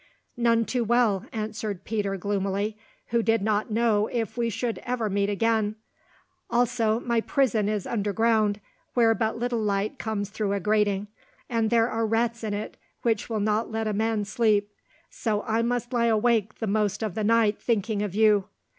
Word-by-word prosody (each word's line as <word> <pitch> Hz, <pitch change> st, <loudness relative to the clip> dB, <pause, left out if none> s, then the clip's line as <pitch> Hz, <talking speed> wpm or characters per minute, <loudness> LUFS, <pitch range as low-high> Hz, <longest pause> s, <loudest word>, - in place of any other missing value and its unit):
"None 230 Hz, -1 st, +2 dB
too 245 Hz, +1 st, -1 dB
well," 225 Hz, -3 st, +2 dB
answered 215 Hz, -3 st, -4 dB
Peter 205 Hz, -2 st, -2 dB
gloomily, 200 Hz, +2 st, -1 dB, 0.3 s
"who 235 Hz, 0 st, +2 dB
did 225 Hz, -2 st, +1 dB
not 215 Hz, +1 st, 0 dB
know 220 Hz, -1 st, +2 dB
if 225 Hz, -3 st, -3 dB
we 235 Hz, -1 st, 0 dB
should 230 Hz, +1 st, -2 dB
ever 235 Hz, -4 st, -2 dB
meet 200 Hz, 0 st, +1 dB
again; 215 Hz, 0 st, +1 dB, 0.7 s
also, 235 Hz, -2 st, +2 dB
my 235 Hz, -1 st, 0 dB
prison 225 Hz, -6 st, +1 dB
is 210 Hz, -3 st, -2 dB
underground, 215 Hz, -1 st, +1 dB, 0.4 s
where 230 Hz, -2 st, +5 dB
but 225 Hz, -1 st, -1 dB
little 240 Hz, -1 st, -1 dB
light 205 Hz, 0 st, -1 dB
comes 205 Hz, -2 st, -3 dB
through 205 Hz, -1 st, -1 dB
a 200 Hz, -, 0 dB
grating, 210 Hz, 0 st, +1 dB, 0.4 s
and 225 Hz, -2 st, +1 dB
there 230 Hz, 0 st, +3 dB
are 225 Hz, -1 st, -1 dB
rats 230 Hz, +1 st, 0 dB
in 210 Hz, -2 st, -2 dB
it 210 Hz, -, -6 dB, 0.3 s
which 225 Hz, -2 st, 0 dB
will 220 Hz, -2 st, -1 dB
not 215 Hz, +2 st, 0 dB
let 220 Hz, 0 st, -2 dB
a 215 Hz, -, 0 dB
man 220 Hz, 0 st, 0 dB
sleep, 210 Hz, -1 st, +1 dB, 0.4 s
so 215 Hz, -3 st, -1 dB
I 225 Hz, +1 st, 0 dB
must 240 Hz, +1 st, -1 dB
lie 235 Hz, -1 st, +2 dB
awake 220 Hz, -1 st, +2 dB
the 225 Hz, -, -4 dB
most 210 Hz, 0 st, 0 dB
of 215 Hz, -4 st, -2 dB
the 215 Hz, -, -2 dB
night 220 Hz, -1 st, +3 dB
thinking 220 Hz, -2 st, 0 dB
of 205 Hz, -3 st, -3 dB
you. 210 Hz, -2 st, +4 dB
220 Hz, 175 wpm, -26 LUFS, 205-230 Hz, 0.7 s, where